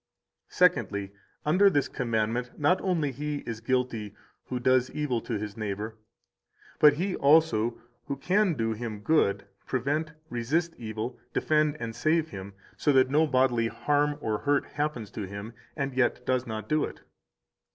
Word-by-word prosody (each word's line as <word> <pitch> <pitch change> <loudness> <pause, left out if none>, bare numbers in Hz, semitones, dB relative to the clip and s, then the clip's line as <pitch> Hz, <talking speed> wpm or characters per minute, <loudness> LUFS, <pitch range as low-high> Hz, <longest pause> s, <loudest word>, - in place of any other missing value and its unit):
189 - - -18 0.3
Secondly, 100 0 -6 0.2
under 185 +7 +5
this 145 -7 +1
commandment 115 0 -1
not 165 +5 +3
only 165 -7 0
he 145 +2 -4
is 115 -1 -5
guilty 115 -4 -1 0.3
who 125 - -3
does 130 0 +3
evil 135 -6 -1
to 115 - -3
his 105 0 -5
neighbor, 110 0 -4 0.8
but 150 -1 +8
he 180 +5 -1
also 140 -6 +3 0.3
who 140 - -2
can 185 +4 +2
do 115 -3 0
him 110 -2 -5
good, 100 -8 +2 0.2
prevent, 145 +5 -1 0.2
resist 150 +9 0
evil, 110 +2 -5
defend 150 -1 +2
and 115 -1 -5
save 160 0 +1
him, 95 -5 -8 0.2
so 145 - +2
that 130 -1 +4
no 155 +2 +4
bodily 130 -4 +2
harm 145 +4 +1
or 110 -4 -1
hurt 145 -1 +1
happen 145 -6 -2
to 100 -1 -6
him, 100 +4 -7 0.2
and 140 -2 -2
yet 125 -1 +1
does 130 -1 0
not 110 -1 -5
do 155 -1 +2
it. - - -6
130 Hz, 160 wpm, -28 LUFS, 110-150 Hz, 0.8 s, but